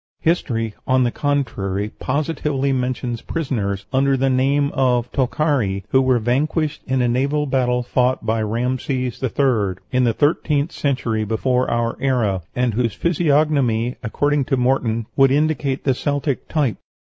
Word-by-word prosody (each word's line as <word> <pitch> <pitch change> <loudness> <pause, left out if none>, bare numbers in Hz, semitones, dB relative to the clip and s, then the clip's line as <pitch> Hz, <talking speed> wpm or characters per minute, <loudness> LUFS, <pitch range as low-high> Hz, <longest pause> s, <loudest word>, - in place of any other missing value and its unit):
History, 115 -10 0
on 130 0 +3
the 120 - +1
contrary, 105 -9 -1
positively 140 -1 -1
mentions 125 -2 -2
prisoners, 105 - -3
under 135 +1 +3
the 135 +1 +1
name 140 +3 +2
of 125 -3 +1
Tokhari, 130 -7 0
who 130 - +4
were 130 -1 +3
vanquished 145 +6 0
in 130 -1 +1
a - - +2
naval 140 +5 +1
battle 125 -2 +1
fought 125 +1 0
by 110 0 0
Rhamses 125 +3 -2
III. 120 -7 +1 0.2
in 125 -1 +2
the 120 -2 +2
thirteenth 150 +1 +1
century 125 -8 -1
before 125 +4 0
our 120 0 -1
era, 115 -9 +1
and 125 -2 +1
whose 115 -1 0
physiognomy, 145 -8 +1
according 145 +4 0
to 135 - 0
Morton, 125 -3 +1
would 135 -1 +5
indicate 140 -2 0
the 135 - +2
Celtic 145 +1 -2
type. 145 -8 0
130 Hz, 145 wpm, -20 LUFS, 120-140 Hz, 0.2 s, would